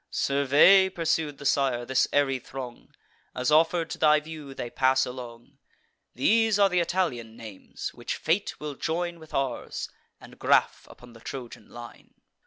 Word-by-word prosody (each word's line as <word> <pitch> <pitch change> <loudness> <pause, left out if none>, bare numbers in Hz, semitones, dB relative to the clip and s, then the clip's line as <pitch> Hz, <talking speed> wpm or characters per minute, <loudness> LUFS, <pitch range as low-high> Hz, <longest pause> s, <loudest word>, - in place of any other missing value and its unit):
"Survey," 145 +8 +4
pursued 160 -5 -1
the 140 - -11
sire, 135 -4 +1
"this 130 +1 +2
airy 135 -2 +1
throng, 125 -1 -9 0.5
As, 125 +3 -1
offer'd 165 +1 +3
to - - -6
thy 150 -1 +5
view, 150 -3 -10
they 120 - -6
pass 130 0 +2
along. 120 -2 -10 0.6
These 220 - +3
are 200 -1 +4
th' - - -9
Italian 130 -11 -2
names, 110 -4 -8
which - - -5
fate 175 +6 -1
will 150 -1 -5
join 170 +4 -3
With 160 -1 -11
ours, 135 -3 -3 0.3
and - - -15
graff - - +2
upon 125 -1 -15
the 115 - -14
Trojan 125 0 -9
line. 120 0 -12
140 Hz, 155 wpm, -26 LUFS, 125-165 Hz, 0.6 s, thy